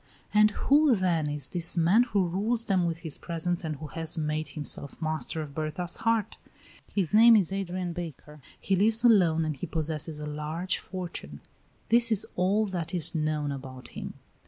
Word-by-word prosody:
And 210 Hz, 0 st, +6 dB
who, 285 Hz, +5 st, +3 dB
then, 170 Hz, -6 st, 0 dB
is 145 Hz, -2 st, -2 dB
this 175 Hz, 0 st, -2 dB
man 175 Hz, +7 st, +5 dB
who 200 Hz, -6 st, +1 dB
rules 220 Hz, +6 st, 0 dB
them 185 Hz, -4 st, +1 dB
with 165 Hz, 0 st, -4 dB
his 155 Hz, -, -5 dB
presence 175 Hz, +2 st, -3 dB
and 155 Hz, -2 st, -3 dB
who 150 Hz, +2 st, -8 dB
has 165 Hz, +1 st, -3 dB
made 155 Hz, 0 st, -2 dB
himself 145 Hz, -2 st, -3 dB
master 160 Hz, 0 st, -3 dB
of 145 Hz, -2 st, -10 dB
Berta's 155 Hz, +3 st, -3 dB
heart? 225 Hz, -1 st, 0 dB, 0.5 s
His 195 Hz, -3 st, -1 dB
name 230 Hz, +2 st, +8 dB
is 195 Hz, -3 st, +2 dB
Adrian 185 Hz, -2 st, -3 dB
Baker, 155 Hz, -3 st, -8 dB, 0.2 s
he 195 Hz, -, 0 dB
lives 220 Hz, +4 st, +2 dB
alone, 175 Hz, -9 st, +4 dB
and 155 Hz, -1 st, -2 dB
he 140 Hz, -, -6 dB
possesses 155 Hz, -1 st, -2 dB
a 150 Hz, -, -5 dB
large 150 Hz, +5 st, -3 dB
fortune. 170 Hz, -, -7 dB, 0.5 s
This 235 Hz, 0 st, +6 dB
is 215 Hz, -2 st, +3 dB
all 195 Hz, +4 st, +2 dB
that 180 Hz, -3 st, -4 dB
is 170 Hz, -1 st, +2 dB
known 155 Hz, -2 st, -1 dB
about 130 Hz, -2 st, -8 dB
him. -, -, -7 dB
170 Hz, 180 wpm, -28 LUFS, 155-195 Hz, 0.5 s, name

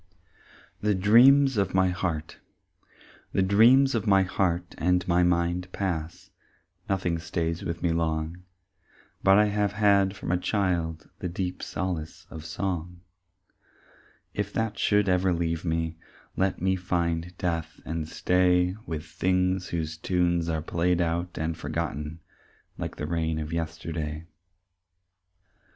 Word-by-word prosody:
"The 105 Hz, -1 st, +2 dB
Dreams 125 Hz, +7 st, +6 dB
of 100 Hz, -2 st, 0 dB
My 95 Hz, -1 st, +4 dB
Heart" 85 Hz, -4 st, -3 dB, 0.9 s
The 95 Hz, -, +3 dB
dreams 120 Hz, +8 st, +5 dB
of 115 Hz, -2 st, -1 dB
my 95 Hz, -1 st, +5 dB
heart 90 Hz, -2 st, -1 dB
and 90 Hz, +1 st, +1 dB
my 90 Hz, 0 st, +3 dB
mind 90 Hz, +1 st, +1 dB
pass, 85 Hz, -4 st, -4 dB, 0.6 s
Nothing 90 Hz, -4 st, 0 dB
stays 85 Hz, 0 st, -2 dB
with 85 Hz, 0 st, -4 dB
me 85 Hz, -, +2 dB
long, 80 Hz, +1 st, -1 dB, 0.8 s
But 95 Hz, 0 st, +6 dB
I 105 Hz, -, +6 dB
have 105 Hz, -1 st, 0 dB
had 100 Hz, -2 st, +3 dB
from 100 Hz, -, -4 dB
a 90 Hz, -, +2 dB
child 90 Hz, -5 st, -1 dB
The 90 Hz, -, -3 dB
deep 90 Hz, +1 st, -4 dB
solace 85 Hz, -4 st, -4 dB
of 80 Hz, 0 st, -8 dB
song; 90 Hz, -1 st, -4 dB, 1.3 s
If 105 Hz, 0 st, -2 dB
that 110 Hz, -1 st, -2 dB
should 105 Hz, -1 st, +3 dB
ever 90 Hz, 0 st, +2 dB
leave 85 Hz, -1 st, -1 dB
me, 80 Hz, -1 st, -1 dB, 0.4 s
Let 95 Hz, 0 st, 0 dB
me 95 Hz, 0 st, +2 dB
find 85 Hz, -1 st, -2 dB
death 80 Hz, -2 st, -3 dB
and 80 Hz, -1 st, -4 dB
stay 90 Hz, 0 st, +2 dB
With 80 Hz, -1 st, -4 dB
things 90 Hz, 0 st, 0 dB
whose 80 Hz, -1 st, -3 dB
tunes 85 Hz, -1 st, 0 dB
are 80 Hz, -1 st, -1 dB
played 85 Hz, +1 st, +1 dB
out 85 Hz, +1 st, -1 dB
and 80 Hz, +1 st, -2 dB
forgotten 75 Hz, 0 st, -4 dB, 0.5 s
Like -, -, -5 dB
the 75 Hz, -, -4 dB
rain 80 Hz, 0 st, -1 dB
of 80 Hz, +1 st, -4 dB
yesterday. 80 Hz, -1 st, -4 dB
90 Hz, 135 wpm, -27 LUFS, 80-95 Hz, 1.3 s, Dreams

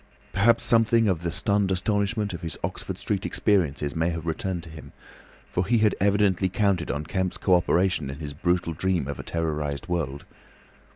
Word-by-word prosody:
Perhaps 115 Hz, +3 st, +4 dB
something 115 Hz, -1 st, +4 dB
of 90 Hz, -5 st, +1 dB
the 85 Hz, -1 st, -2 dB
stunned 100 Hz, +2 st, +1 dB
astonishment 100 Hz, +2 st, 0 dB
of 85 Hz, -, -6 dB
his 80 Hz, -2 st, -5 dB
Oxford -, -, -4 dB
Street 100 Hz, -1 st, -2 dB
experiences 80 Hz, -12 st, +1 dB
may 80 Hz, +1 st, +1 dB
have 85 Hz, -1 st, -4 dB
returned 85 Hz, +1 st, -2 dB
to 80 Hz, -, -10 dB
him, 80 Hz, -1 st, -11 dB, 0.6 s
for 90 Hz, -, 0 dB
he 115 Hz, +6 st, +2 dB
had 105 Hz, -2 st, +3 dB
evidently 100 Hz, -1 st, +2 dB
counted 95 Hz, -3 st, +1 dB
on 75 Hz, +1 st, -2 dB
Kemp's 95 Hz, +2 st, -2 dB
co 95 Hz, -, +2 dB
operation 90 Hz, -4 st, +2 dB
in 70 Hz, -, -6 dB
his 75 Hz, -2 st, -6 dB
brutal 85 Hz, +2 st, 0 dB
dream 90 Hz, -3 st, 0 dB
of 70 Hz, -, -5 dB
a -, -, -5 dB
terrorised 75 Hz, -4 st, -3 dB
world. 75 Hz, -6 st, -2 dB
90 Hz, 180 wpm, -25 LUFS, 80-100 Hz, 0.6 s, Perhaps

